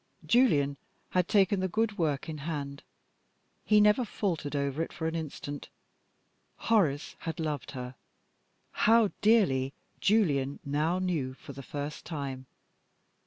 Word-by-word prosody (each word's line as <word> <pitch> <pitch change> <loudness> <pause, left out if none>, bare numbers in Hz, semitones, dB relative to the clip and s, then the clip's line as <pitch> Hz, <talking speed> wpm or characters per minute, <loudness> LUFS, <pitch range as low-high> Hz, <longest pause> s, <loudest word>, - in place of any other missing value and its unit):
Julian 145 - +3 0.3
had 180 -1 +2
taken 200 -1 +3
the 185 - 0
good 215 +2 -1
work 150 -4 0
in 155 -2 -5
hand: 140 -2 -4 0.8
he 210 -1 +5
never 210 +4 +5
faltered 170 -9 -2
over 140 +2 -1
it 165 - -3
for 160 - -5
an 160 - -1
instant. 145 -3 -5 0.9
Horace 165 -11 +1
had 165 +1 -5
loved 150 -4 -3
her 125 -1 -6 0.8
how 225 -2 +4
dearly 180 - +3 0.3
Julian 145 -10 +2
now 150 +5 +1
knew 165 -9 -1
for 140 - -11
the 135 - -8
first 145 +2 -5
time. 135 -5 -5
160 Hz, 130 wpm, -30 LUFS, 140-200 Hz, 0.9 s, he